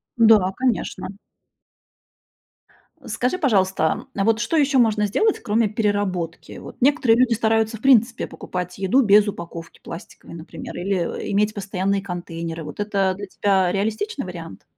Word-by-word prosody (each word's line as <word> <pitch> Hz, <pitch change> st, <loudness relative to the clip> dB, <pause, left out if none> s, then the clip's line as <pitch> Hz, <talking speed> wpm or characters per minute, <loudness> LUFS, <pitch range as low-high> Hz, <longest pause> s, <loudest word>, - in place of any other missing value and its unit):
Да, 220 Hz, -5 st, +5 dB
конечно. 250 Hz, -6 st, -2 dB, 2.0 s
Скажи, 255 Hz, +9 st, -1 dB
пожалуйста, 190 Hz, -, +1 dB
а 195 Hz, -, 0 dB
вот, 225 Hz, +1 st, +2 dB
что 275 Hz, +8 st, 0 dB
ещё 280 Hz, -2 st, +3 dB
можно 215 Hz, -3 st, +3 dB
сделать, 420 Hz, -, +1 dB
кроме 215 Hz, +1 st, +1 dB
переработки? 205 Hz, -6 st, -2 dB
Вот, -, -, -11 dB
некоторые 260 Hz, -4 st, +4 dB
люди 250 Hz, -2 st, +4 dB
стараются, 225 Hz, 0 st, +1 dB
в -, -, -21 dB
принципе, 240 Hz, -3 st, +3 dB
покупать 180 Hz, 0 st, -6 dB
еду 195 Hz, +8 st, +3 dB
без 210 Hz, 0 st, +5 dB
упаковки 170 Hz, -4 st, -7 dB
пластиковой, 165 Hz, +1 st, -10 dB
например. 165 Hz, 0 st, -9 dB
Или, 185 Hz, -1 st, -2 dB
э, -, -, -3 dB
иметь 210 Hz, +1 st, +1 dB
постоянные 195 Hz, 0 st, -1 dB
контейнеры. 170 Hz, -3 st, -6 dB
Вот 150 Hz, +5 st, -9 dB
это 200 Hz, -2 st, 0 dB
для 200 Hz, 0 st, -7 dB
тебя 190 Hz, -2 st, +1 dB
реалистичный 220 Hz, -, -2 dB
вариант? -, -, -9 dB
205 Hz, 140 wpm, -22 LUFS, 185-225 Hz, 2.0 s, Да